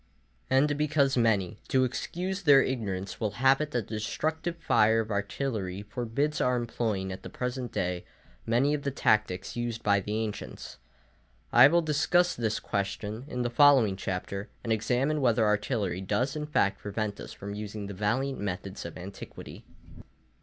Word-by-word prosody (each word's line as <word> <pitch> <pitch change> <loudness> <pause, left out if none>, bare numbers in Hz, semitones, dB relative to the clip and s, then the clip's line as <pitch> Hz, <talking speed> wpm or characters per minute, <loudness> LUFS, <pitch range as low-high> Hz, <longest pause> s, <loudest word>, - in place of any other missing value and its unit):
And 145 +2 +3
because 145 -2 +2
many, 110 -4 +1
to 130 -1 +3
excuse 180 +9 -3
their 145 -6 +7
ignorance, 100 -7 -3
will 105 -3 -1
have 135 +3 +4
it 150 - -2
that 120 -7 -2
the 110 - -4
destructive 160 +9 -2
fire 115 -8 +3
of 110 0 -6
artillery 100 -2 -2
forbids 125 +7 -2
our 125 0 +2
employing 110 -5 -2
at 95 - -7
the - - -8
present 125 -1 -4
day 90 -1 -2 0.4
many 125 +6 +2
of 150 - -1
the 140 - -1
tactics 105 -8 +1
used 120 -1 -3
by 100 -1 +4
the 105 +2 -4
ancients, 105 -2 -7 0.8
I 120 +2 +9
will 170 +3 +3
discuss 175 +4 +2
this 110 -2 -1
question 105 +4 -3
in 125 -4 -3
the 120 - -1
following 130 -6 +5
Chapter, 100 +2 -4
and 115 - +1
examine 125 +7 0
whether 120 -3 +3
artillery 105 -3 0
does 125 +9 -1
in 150 0 -3
fact 100 -9 +1
prevent 105 0 -3
us - - -8
from 100 +1 -7
using 105 0 -5
the 100 - -6
valiant 120 +8 -1
methods 95 -1 -4
of 85 - -7
antiquity. 95 +2 -9
115 Hz, 165 wpm, -28 LUFS, 100-135 Hz, 0.8 s, I